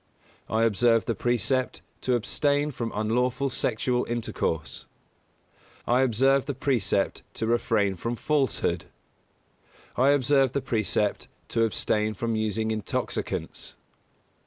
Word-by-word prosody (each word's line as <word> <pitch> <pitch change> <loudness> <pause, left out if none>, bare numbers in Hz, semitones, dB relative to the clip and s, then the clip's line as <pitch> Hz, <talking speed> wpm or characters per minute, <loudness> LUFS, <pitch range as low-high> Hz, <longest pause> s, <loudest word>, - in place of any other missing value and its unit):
I 110 +1 +2
observe 115 +1 +3
the 115 - 0
precept 120 +4 0 0.2
to 125 - +1
abstain 145 +5 +1
from 115 -3 -4
unlawful 125 +5 0
sexual 125 +2 0
intercourse. 110 -8 -3 1.0
I 125 +2 +3
observe 135 +2 +3
the 140 - -2
precept 105 -7 0
to 115 - -2
refrain 110 -3 +1
from 115 +6 -3
falsehood. 140 +1 0 1.1
I 130 +2 +4
observe 135 -1 +3
the 140 - 0
precept 110 -4 0 0.2
to 115 -1 +2
abstain 110 0 0
from 115 +2 -1
using 110 0 -1
intoxicants. 110 -2 -3
120 Hz, 110 wpm, -26 LUFS, 110-130 Hz, 1.1 s, I